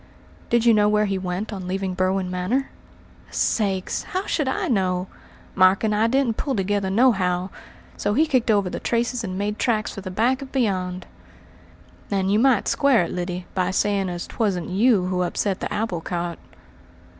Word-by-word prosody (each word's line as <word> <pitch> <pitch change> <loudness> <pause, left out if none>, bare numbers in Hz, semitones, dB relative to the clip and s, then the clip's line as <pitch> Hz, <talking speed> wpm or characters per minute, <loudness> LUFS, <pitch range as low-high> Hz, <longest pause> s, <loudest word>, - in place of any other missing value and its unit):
"Did 235 -1 +2
you 235 - +6
not 210 - +4
know 205 - +4
where 210 0 +3
he 195 -2 -1
went 185 +4 -4
on 185 -2 -6
leaving 190 0 -2
Berwin 185 0 0
Manor?" 190 +10 -1 0.6
"Sakes! 195 -4 0
how 375 +2 -4
should 300 -4 -1
I? 265 - -1 0.9
Mark 185 +1 +4
and 215 -1 +1
I 215 +2 +3
didn't 250 -2 +1
pull 275 -3 -1
together 200 -1 0
nohow, 190 -5 +2 0.5
so 205 +1 -1
he 310 +5 +4
kicked 255 -6 +1
over 200 -3 +3
the - - -4
traces 235 +1 -1
and 185 -3 -4
made 205 +1 -2
tracks 215 -3 0
for 195 - -7
the 185 - -6
back 240 +8 +1
of 270 - -8
beyond." 185 -7 -1 1.0
"And 195 -1 0
you 210 - +3
might 255 -4 +3
square 275 -8 +3
it, 170 - -4
Lyddy, 180 0 -4
by 180 -1 0
saying 195 0 0
as 175 -1 -4
'twasn't 195 -7 -2
you 200 0 +3
who 180 0 -1
upset 185 +2 -1
the - - -4
apple 205 -6 -2
cart." 175 0 -4
200 Hz, 180 wpm, -23 LUFS, 185-230 Hz, 1.0 s, you